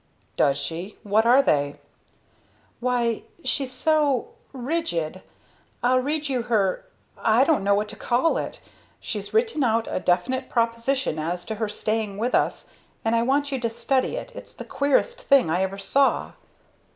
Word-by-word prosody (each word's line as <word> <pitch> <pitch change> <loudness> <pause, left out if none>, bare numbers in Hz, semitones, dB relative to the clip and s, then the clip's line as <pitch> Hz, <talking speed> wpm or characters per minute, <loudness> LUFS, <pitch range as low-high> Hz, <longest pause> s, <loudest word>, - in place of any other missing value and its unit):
"Does 140 -1 +3
she? 175 +5 -5
What 215 +2 +2
are 260 +3 +6
they?" 145 - +1 1.0
"Why 240 -2 0 0.2
she's 270 -2 -1
so 295 - +1 0.2
rigid. 245 - -2 0.6
I'll 255 +1 +4
read 295 +3 -1
you 260 -3 0
her 220 - 0 0.3
I 225 +3 +4
don't 285 -8 +2
know 200 0 +3
what 210 +1 0
to 220 - -4
call 245 +9 +1
it. - - -6 0.4
She's - - -5
written 450 - +1
out 225 -1 +1
a - - -2
definite 250 +10 0
proposition 230 - 0
as 175 +3 -3
to 220 - -3
her 220 0 -2
staying 215 -1 -2
with 235 +4 -1
us, - - 0 0.3
and 225 +1 +2
I 230 - +3
want 280 +4 +1
you 270 - -1
to 235 -1 -1
study 255 - 0
it, - - -6
it's - - -11
the - - -8
queerest 290 - +1
thing 275 - +4
I 175 +3 +1
ever 190 +1 -2
saw." 270 +8 +1
235 Hz, 165 wpm, -24 LUFS, 205-275 Hz, 1.0 s, are